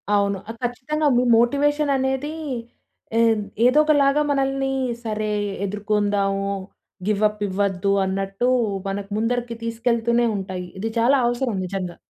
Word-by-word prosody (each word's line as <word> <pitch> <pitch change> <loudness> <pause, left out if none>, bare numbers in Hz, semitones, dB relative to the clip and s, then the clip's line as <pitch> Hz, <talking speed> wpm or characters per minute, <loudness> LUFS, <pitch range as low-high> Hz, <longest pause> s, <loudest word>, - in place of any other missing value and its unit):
అవును. 200 -1 +1
ఆహ్, 225 - -6
కచ్చితంగా 275 +5 -1
మీ 245 - +3 0.2
మోటివేషన్ 290 +4 +2
అనేది 265 +3 -1 0.8
ఎ - - +4 0.5
ఏదో 255 +4 +5
ఒకలాగా 290 -1 +3
మనల్ని, 270 -1 0 0.3
సరే 215 -1 -2 0.4
ఎదుర్కొందాము 205 -1 0 0.6
గివ్ 210 -1 +1
అప్ 210 0 -8
ఇవ్వద్దు, 195 0 0
అన్నట్టు, 195 +5 -1 0.4
మనకు 195 0 -4
ముందరికి 235 +1 -1
తీసుకెళ్తూనే 235 +1 +1
ఉంటాయి. 185 -2 -5
ఇది 225 +3 -2
చాలా 255 +5 +4
అవసరం 240 -2 -1
నిజంగా. 180 -2 -4
230 Hz, 120 wpm, -22 LUFS, 200-265 Hz, 0.8 s, ఏదో